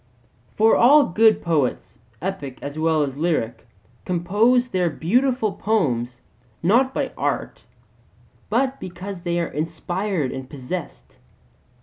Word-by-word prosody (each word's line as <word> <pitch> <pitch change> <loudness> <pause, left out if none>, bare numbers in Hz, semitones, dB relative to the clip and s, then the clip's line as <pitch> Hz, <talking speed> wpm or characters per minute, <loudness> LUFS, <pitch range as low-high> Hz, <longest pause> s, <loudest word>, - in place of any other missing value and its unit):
For 220 +1 +5
all 285 +4 +6
good 220 +3 +3
poets, 125 - -1 0.2
epic 150 -9 -4
as 145 +2 -6
well 160 -1 +2
as 135 -1 -4
lyric, 145 -8 -1 0.4
compose 210 +8 +2
their 180 -5 +1
beautiful 230 - +1
poems 125 - -1 0.4
not 240 +9 +3
by - - -2
art, - - -2 0.9
but 265 +4 0
because 185 +1 -7
they 175 -1 -1
are 170 - 0
inspired 170 +1 -2
and 130 -1 -7
possessed. 145 +5 -7
175 Hz, 115 wpm, -22 LUFS, 145-220 Hz, 0.9 s, all